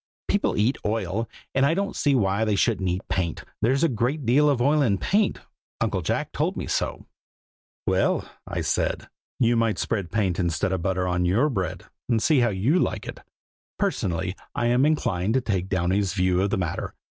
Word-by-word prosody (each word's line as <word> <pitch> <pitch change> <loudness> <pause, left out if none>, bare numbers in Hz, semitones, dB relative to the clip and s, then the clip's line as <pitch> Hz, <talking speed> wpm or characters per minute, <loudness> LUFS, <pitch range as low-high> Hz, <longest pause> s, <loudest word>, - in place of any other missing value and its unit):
People 200 - +1
eat 115 +6 +2
oil, 105 +1 -1 0.2
and 135 - +2
I 150 +4 +3
don't 200 +1 -2
see 145 -2 +2
why 100 -2 +2
they 105 -2 +1
shouldn't 100 -3 +1
eat 90 +2 -3
paint; 85 -4 -2 0.2
there's 130 +7 +2
a - - +6
great 130 +3 -1
deal 145 +6 +4
of 140 -4 +1
oil 145 +5 +3
in 105 -8 +2
paint, 205 - +1 0.4
Uncle - - 0
Jack - - -1
told - - -1
me - - -3
so." - - -2 0.8
"Well," - - +1 0.2
I - - -3
said, - - -1 0.3
"you 120 -1 +3
might 115 -4 +1
spread 100 -4 -2
paint 95 -4 0
instead 85 +2 0
of 95 - -1
butter 90 0 0
on 90 0 0
your 110 +12 +3
bread, 95 -6 -3 0.2
and 115 -2 +3
see 140 +6 +3
how 120 -1 +3
you 110 - +2
like - - -1
it. - - -7 0.6
Personally, 95 - -1 0.2
I - - 0
am 125 +4 +4
inclined 115 - 0
to 130 - +3
take 95 -5 -2
Downy's 95 +1 0
view 90 -1 +2
of 100 - +1
the 110 - 0
matter. 90 -3 -3
110 Hz, 190 wpm, -25 LUFS, 95-130 Hz, 0.8 s, a